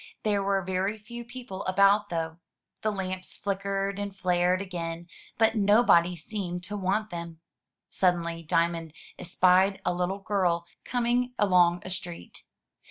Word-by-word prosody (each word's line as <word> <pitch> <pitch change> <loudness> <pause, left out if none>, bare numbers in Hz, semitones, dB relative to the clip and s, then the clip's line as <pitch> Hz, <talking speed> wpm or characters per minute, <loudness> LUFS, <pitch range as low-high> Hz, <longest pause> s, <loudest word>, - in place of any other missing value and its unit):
There 205 -2 +1
were 195 -1 +1
very 190 +3 -1
few 235 +3 -9
people 240 -5 -8
about, 200 +2 +4
though. 165 -1 -3 0.4
The 215 - 0
lamps 185 -2 -5
flickered 195 0 -2
and 200 -1 -4
flared 180 -1 +2
again, 170 -3 -5 0.3
but 225 0 +4
nobody 205 -5 +4
seemed 180 0 -5
to 205 +3 -5
want 200 +2 -1
them. 170 -1 -6 0.5
Suddenly 170 -2 0
Diamond 165 0 0 0.3
espied 185 +3 +3
a 180 - +2
little 180 +2 -1
girl 185 -4 0 0.2
coming 245 0 0
along 180 -3 +4
a 185 - -5
street. 175 - -6
190 Hz, 135 wpm, -28 LUFS, 175-205 Hz, 0.5 s, about